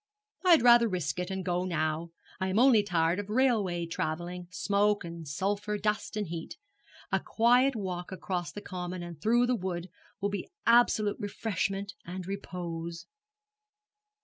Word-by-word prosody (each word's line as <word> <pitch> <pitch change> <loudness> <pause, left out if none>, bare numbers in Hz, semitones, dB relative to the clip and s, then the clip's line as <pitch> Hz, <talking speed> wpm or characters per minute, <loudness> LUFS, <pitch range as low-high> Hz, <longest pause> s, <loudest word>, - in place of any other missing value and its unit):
'I 365 - +2
had 330 -6 +8
rather 240 -1 +7
risk 175 -4 -2
it, 180 +1 -2
and 190 -1 -4
go 180 -1 0
now. 160 -1 -1 0.3
I 190 - 0
am 190 +2 0
only 245 -2 +6
tired 175 -2 +1
of 205 0 -5
railway 210 -8 +2
travelling, 175 +2 -4
smoke 205 +2 +1
and 170 -2 -7
sulphur, 200 +7 -1
dust 210 +1 -1
and 210 - -1
heat. 165 -1 -6 0.5
A - - +3
quiet 245 +4 +3
walk 180 -4 -4
across 180 -2 -3
the 205 - -7
common 180 -2 -5
and 170 -3 -9
through 240 +4 +4
the 250 - +1
wood 180 -3 -4 0.3
will 200 0 0
be 200 - -4 0.2
absolute 230 -3 +4
refreshment 200 -1 -2
and 180 +1 -6
repose.' 170 -3 -5
190 Hz, 155 wpm, -30 LUFS, 175-210 Hz, 0.5 s, had